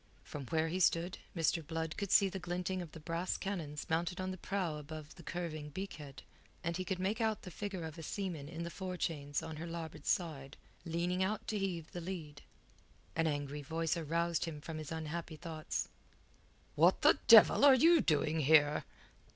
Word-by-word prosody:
From 140 -4 -7
where 160 +2 +1
he 180 +3 -2
stood, 175 0 +2 0.2
Mr. 165 0 +2
Blood 160 +1 -3
could 200 -2 -3
see 200 - +6
the 190 0 -4
glinting 180 +1 -2
of 170 -3 -8
the 160 - -8
brass 165 +3 -2
cannons 165 -7 -4
mounted 170 +3 0
on 185 0 -2
the 185 - -6
prow 180 -6 -2
above 150 0 -8
the 175 - -13
curving 155 -3 -4
beak 190 +6 -5
head, 140 -3 -10 0.4
and 170 +1 -1
he 185 - -2
could 185 +1 -2
make 200 +5 -1
out 220 -2 0
the 180 - -8
figure 195 -2 -4
of 160 0 -7
a - - -5
seaman 165 -4 -4
in 165 +1 -5
the 170 - -5
forechains 165 -7 -3
on 160 - -6
her 165 +3 -5
larboard 165 -1 -6
side, 150 -6 -1 0.3
leaning 175 +2 -1
out 210 +3 -1
to 215 - -1
heave 175 -5 -3
the 175 - -5
lead. 165 -5 -6 0.7
An 165 0 +2
angry 145 -1 -2
voice 160 +3 -1
aroused 170 +1 0
him 160 -3 -5
from 155 +1 -6
his 155 0 -7
unhappy 160 +1 -4
thoughts. 160 -1 -4 0.9
"What - - +4
the - - +6
devil - - +9
are 280 -2 +9
you 330 +6 +6
doing 155 0 +2
here?" 150 0 +5
165 Hz, 190 wpm, -35 LUFS, 155-185 Hz, 0.9 s, devil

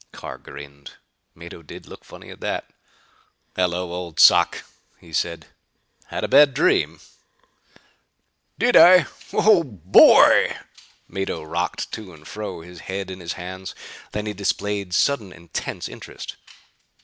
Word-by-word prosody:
Carr - - -9
grinned. 70 0 -12 0.4
Mado 85 0 -11
did 80 - -12
look - - -13
funny - - -13
at - - -13
that. - - -4 0.9
"Hello, 90 -1 -1
old 90 -2 -6
sock," 85 -1 +5 0.4
he 80 - -17
said, 85 +1 -2 0.6
"had - - -5
a - - 0
bad 145 -3 +5
dream?" 150 - +1 1.6
"Did 245 +1 +2
I? 180 -2 +8 0.3
Oh 210 -4 +4
boy!" 95 - +5 0.5
Mado 95 -5 -4
rocked 75 - -3
to 95 -6 -8
and 75 0 -16
fro, 105 -1 -7
his 90 +1 -13
head 95 0 -4
in 95 - -8
his 85 -2 -5
hands. 95 +1 -8 0.4
Then 105 0 -4
he 105 - -4
displayed 100 -1 -2
sudden 110 -8 +1
intense 85 -1 -6
interest. - - -10
90 Hz, 130 wpm, -22 LUFS, 85-105 Hz, 1.6 s, I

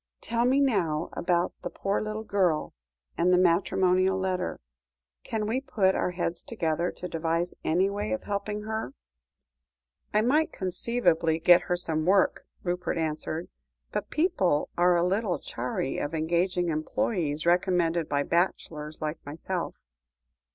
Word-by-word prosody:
"Tell 235 +1 0
me 265 +3 +4
now 180 - +1
about 175 0 0
the - - -4
poor 195 +1 -1
little 215 0 -4
girl, 185 -7 +1 0.5
and 175 +2 +4
the 180 - +5
matrimonial 185 +1 +3
letter. 185 -1 -2 0.6
Can 220 -1 -2
we 235 +5 0
put 195 -8 +2
our - - 0
heads 175 -1 -3
together 170 -5 -1
to 180 - -6
devise 165 +1 -1
any 180 +5 +2
way 205 +1 -3
of 275 - -2
helping 205 +1 -3
her?" 220 - -4 1.2
"I 210 - +3
might 300 +8 +2
conceivably 180 -4 +1
get 175 +1 +7
her 180 - +3
some 160 -3 -2
work," 190 0 +3 0.2
Rupert 180 -1 -2
answered, 160 +1 -3 0.4
"but - - -3
people 195 - +1
are 175 +1 +4
a 170 - +2
little 190 +1 +1
chary 125 +2 -3
of 145 +3 -3
engaging 175 +2 +1
employees 155 0 -1
recommended 175 -2 +2
by 145 -1 +1
bachelors 155 -3 -1
like 155 +1 -4
myself. 165 +5 -5
180 Hz, 140 wpm, -28 LUFS, 165-200 Hz, 1.2 s, get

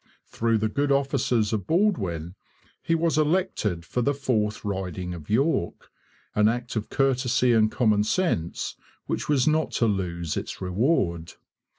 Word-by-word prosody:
Through 115 0 0
the 110 0 0
good 140 +6 0
offices 125 -5 +1
of 100 -3 -2
Baldwin 95 - 0 0.5
he 165 - +1
was 165 -1 +1
elected 150 - 0
for 125 - -2
the 140 +4 +1
fourth 110 -7 -1
riding 95 -2 -3
of 80 -4 -10
York, 125 - 0 0.4
an 105 0 +4
act 120 +2 -2
of 110 -1 -3
courtesy 125 -2 +2
and 110 -1 +4
common 110 -4 +2
sense 110 - -1 0.3
which - - -3
was 140 -3 +3
not 155 0 +2
to 115 - +2
lose 85 -6 -2
its - - -5
reward. 90 - 0
115 Hz, 150 wpm, -25 LUFS, 95-140 Hz, 0.5 s, an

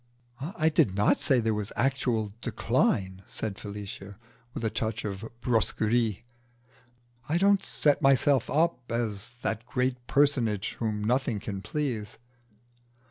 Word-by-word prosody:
"I 155 +2 0
did 100 -11 +3
not 105 +1 +3
say 130 -3 +3
there 110 -1 +1
was 105 0 -3
actual 120 -5 0
decline," 95 -1 0
said 105 -2 -4
Felicia, 100 -1 -7 0.4
with 115 - -3
a 110 - 0
touch 110 0 -2
of 100 +1 -4 0.2
brusquerie. 115 -2 +1 1.1
"I 160 - +2
don't 200 +1 +4
set 145 0 +2
myself 135 -1 +4
up 150 -6 +1
as 115 -1 -2
the 110 - 0
great 125 -1 -1
personage 120 -8 +2
whom 110 -2 -1
nothing 120 -1 +1
can 100 -1 -5
please." 120 -1 -3
115 Hz, 130 wpm, -28 LUFS, 105-135 Hz, 1.1 s, don't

